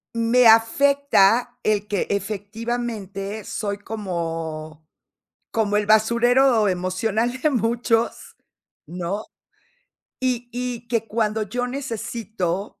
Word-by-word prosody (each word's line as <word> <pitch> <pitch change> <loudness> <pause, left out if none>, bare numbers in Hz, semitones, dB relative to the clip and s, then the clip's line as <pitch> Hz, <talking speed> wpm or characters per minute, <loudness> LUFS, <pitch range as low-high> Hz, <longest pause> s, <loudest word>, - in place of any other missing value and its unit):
Me 230 +1 +4
afecta 245 0 +4
el 210 -2 0
que 200 -3 -1
efectivamente 210 0 -4
soy 200 0 -4
como 165 -7 -5 0.6
como 210 -2 +1
el 210 -1 0
basurero 235 +2 +4
emocional 205 +7 -1
de 305 - +3
muchos, 230 -2 0 0.5
¿no?, 180 +4 -4 1.0
y 245 -2 -1
y 245 -1 -4
que 230 -2 0
cuando 220 -1 0
yo 245 +4 -3
necesito, 220 -7 -4
220 Hz, 95 wpm, -23 LUFS, 200-240 Hz, 1.0 s, Me